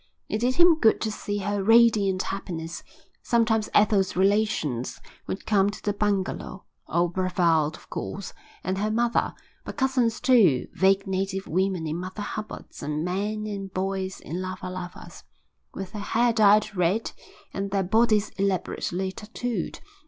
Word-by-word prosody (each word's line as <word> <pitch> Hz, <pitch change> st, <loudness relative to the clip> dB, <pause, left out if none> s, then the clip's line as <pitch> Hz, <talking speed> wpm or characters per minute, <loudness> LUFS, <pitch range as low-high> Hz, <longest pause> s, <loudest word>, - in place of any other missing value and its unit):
It 215 Hz, -, -2 dB
did 250 Hz, +3 st, +1 dB
him 345 Hz, -2 st, +6 dB
good 225 Hz, -5 st, +4 dB
to 220 Hz, -, -1 dB
see 205 Hz, -1 st, -4 dB
her 205 Hz, 0 st, -1 dB
radiant 215 Hz, -4 st, +4 dB
happiness. 170 Hz, -4 st, -5 dB, 0.4 s
Sometimes 225 Hz, -2 st, +1 dB
Ethel's 205 Hz, -2 st, +3 dB
relations 190 Hz, -, +1 dB, 0.3 s
would 190 Hz, -, -5 dB
come 200 Hz, -2 st, +3 dB
to 205 Hz, -, -7 dB
the 205 Hz, -, 0 dB
bungalow, 200 Hz, -2 st, -2 dB, 0.2 s
old 170 Hz, +1 st, +1 dB
Brevald 170 Hz, -4 st, +2 dB
of -, -, -19 dB
course, 195 Hz, 0 st, -5 dB, 0.3 s
and 185 Hz, +1 st, -2 dB
her 210 Hz, +1 st, 0 dB
mother, 235 Hz, +2 st, +1 dB, 0.3 s
but -, -, -8 dB
cousins 260 Hz, -4 st, +1 dB
too, 200 Hz, -, +4 dB
vague 195 Hz, +2 st, +3 dB
native 195 Hz, 0 st, -2 dB
women 185 Hz, 0 st, 0 dB
in 155 Hz, +1 st, -2 dB
Mother 185 Hz, +3 st, -5 dB
Hubbards 215 Hz, +1 st, -7 dB
and 150 Hz, +2 st, -2 dB
men 205 Hz, +4 st, -2 dB
and 200 Hz, -2 st, -5 dB
boys 190 Hz, 0 st, -2 dB
in 175 Hz, +4 st, -5 dB
lava 185 Hz, 0 st, -5 dB
lavas, 180 Hz, -1 st, -8 dB, 0.5 s
with 195 Hz, -1 st, -6 dB
their 210 Hz, -1 st, -6 dB
hair 235 Hz, +3 st, +2 dB
dyed 215 Hz, -1 st, +4 dB
red 180 Hz, +5 st, +1 dB, 0.4 s
and 195 Hz, 0 st, -3 dB
their 195 Hz, 0 st, 0 dB
bodies 215 Hz, +2 st, +3 dB
elaborately 190 Hz, -1 st, -1 dB
tattooed. 220 Hz, 0 st, -4 dB
195 Hz, 150 wpm, -26 LUFS, 185-215 Hz, 0.5 s, him